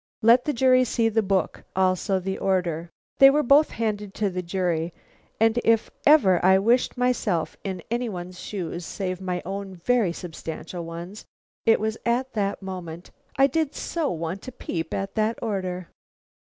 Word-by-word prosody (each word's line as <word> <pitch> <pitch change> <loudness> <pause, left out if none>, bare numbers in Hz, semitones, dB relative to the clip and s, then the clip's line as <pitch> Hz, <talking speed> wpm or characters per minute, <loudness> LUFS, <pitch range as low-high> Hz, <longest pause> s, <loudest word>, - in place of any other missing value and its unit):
"Let 235 +3 +6
the 300 - +1
jury 255 0 +4
see 230 -2 +1
the 225 0 +2
book; 195 -3 -1
also 190 +1 +1
the 190 +1 -4
order." 175 -3 0 0.3
They 270 - +10
were 300 +2 +2
both 285 +5 +5
handed 210 -3 -3
to 205 -2 0
the 180 0 -3
jury, 175 -2 -1 0.5
and 225 +2 +3
if 225 -1 +2 0.2
ever 200 - +5
I 190 +1 +6
wished 235 +6 +2
myself 240 -9 0
in 190 -2 -4
any 240 0 -1
one's 180 -2 -7
shoes, 175 -3 -5
save 185 +1 -4
my 180 -1 -3
own 195 0 -5
very 215 +1 +1
substantial 170 0 -7
ones, 170 +5 -8 0.4
it 225 - +5
was 220 +1 -2
at 250 +2 0
that 200 -2 -2
moment. 180 -3 -7 0.3
I 270 - +6
did 295 +1 0
so 330 -4 -2
want 170 +6 -4
a - - -5
peep 175 -9 -5
at 195 0 -3
that 220 +1 0
order. 185 -5 -3
195 Hz, 170 wpm, -25 LUFS, 180-235 Hz, 0.5 s, They